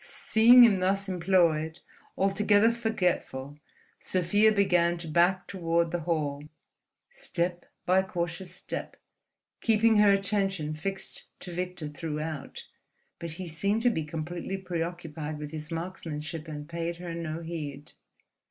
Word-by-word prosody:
Seeing 240 Hz, +3 st, +6 dB
him 210 Hz, -5 st, +5 dB
thus 195 Hz, +2 st, +1 dB
employed, 170 Hz, -3 st, +2 dB, 0.4 s
altogether 205 Hz, +3 st, +4 dB
forgetful, 180 Hz, -, -2 dB, 0.4 s
Sofia 205 Hz, +4 st, +3 dB
began 175 Hz, -4 st, +3 dB
to 170 Hz, -1 st, -7 dB
back 175 Hz, +3 st, +3 dB
toward 170 Hz, -3 st, 0 dB
the 175 Hz, -, -1 dB
hall, 150 Hz, -4 st, -2 dB, 0.7 s
step 175 Hz, -, -3 dB, 0.2 s
by 185 Hz, +1 st, +4 dB
cautious 175 Hz, -1 st, -4 dB
step, 175 Hz, -, -6 dB, 0.7 s
keeping 225 Hz, 0 st, +4 dB
her 210 Hz, -1 st, +6 dB
attention 195 Hz, -5 st, 0 dB
fixed 195 Hz, +5 st, -4 dB, 0.2 s
to 180 Hz, -, -7 dB
Victor 180 Hz, -2 st, -4 dB
throughout. 150 Hz, -1 st, -5 dB, 0.6 s
But 170 Hz, -2 st, -5 dB
he 180 Hz, +2 st, -7 dB
seemed 200 Hz, +7 st, 0 dB
to 245 Hz, -, +5 dB
be 160 Hz, -8 st, -2 dB
completely 165 Hz, +5 st, -4 dB
preoccupied 165 Hz, -4 st, -4 dB
with 150 Hz, 0 st, -7 dB
his 155 Hz, -1 st, -6 dB
markmanship, 165 Hz, -2 st, -5 dB
and 150 Hz, -1 st, -7 dB
paid 170 Hz, +1 st, -3 dB
her 175 Hz, -1 st, -6 dB
no 165 Hz, -1 st, -4 dB
heed. 150 Hz, -3 st, -6 dB
175 Hz, 125 wpm, -28 LUFS, 160-195 Hz, 0.7 s, Seeing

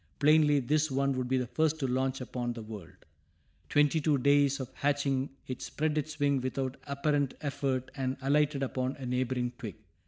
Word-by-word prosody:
Plainly 150 Hz, -1 st, +5 dB
this 150 Hz, +4 st, +1 dB
one 140 Hz, +1 st, +1 dB
would 130 Hz, -1 st, -2 dB
be 130 Hz, +1 st, +1 dB
the 125 Hz, -, 0 dB
first 160 Hz, +5 st, +1 dB
to 135 Hz, -, 0 dB
launch 130 Hz, +1 st, 0 dB
upon 120 Hz, -1 st, -3 dB
the 115 Hz, -2 st, -7 dB
world. 105 Hz, -5 st, -10 dB, 0.6 s
Twenty 150 Hz, +2 st, +3 dB
two 150 Hz, -1 st, +3 dB
days 140 Hz, +1 st, +3 dB
after 130 Hz, -1 st, -6 dB
hatching 140 Hz, -1 st, +1 dB, 0.2 s
it 130 Hz, -, -6 dB
spread 155 Hz, 0 st, -1 dB
its 155 Hz, 0 st, -3 dB
wings 140 Hz, -2 st, +2 dB
without 130 Hz, +1 st, -2 dB
apparent 140 Hz, -1 st, 0 dB
effort 135 Hz, -3 st, -2 dB
and 130 Hz, -1 st, -2 dB
alighted 140 Hz, +1 st, +2 dB
upon 130 Hz, 0 st, -2 dB
a 135 Hz, -, -8 dB
neighboring 125 Hz, 0 st, -1 dB
twig. 110 Hz, -8 st, -6 dB
135 Hz, 180 wpm, -30 LUFS, 130-145 Hz, 0.6 s, Plainly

